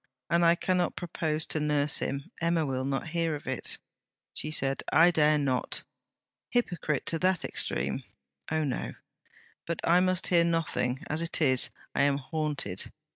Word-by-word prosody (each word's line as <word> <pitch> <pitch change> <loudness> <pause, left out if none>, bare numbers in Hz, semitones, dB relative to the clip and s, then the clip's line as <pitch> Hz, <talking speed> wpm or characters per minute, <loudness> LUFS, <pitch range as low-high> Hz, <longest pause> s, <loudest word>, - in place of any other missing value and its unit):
'And 170 0 +4
I 170 0 +6
cannot 180 0 0
propose 155 -3 -1
to 155 - -1
nurse 150 -1 +1
him 140 +6 -3
Emma 165 -1 +2
will 130 -1 -2
not 135 +3 -2
hear 165 -1 0
of 145 - -9
it,' 130 -1 -3 0.6
she 155 - 0
said. 135 -3 0
'I 165 +3 +6
dare 155 -2 +4
not. 135 -3 -1 0.7
Hypocrite 175 - 0
to 165 - -1
that 185 -1 +2
extreme? - - -1 0.5
Oh, 155 0 +1
no! 135 -4 -3 0.7
But 170 - -2
I 175 +2 +6
must 185 0 +2
hear 170 -2 +5
nothing. 165 -5 0
As 155 +2 -1
it 170 0 -1
is, 130 -5 +2 0.2
I - - +1
am 140 0 +3
haunted. 145 - -2
155 Hz, 160 wpm, -29 LUFS, 140-170 Hz, 0.7 s, I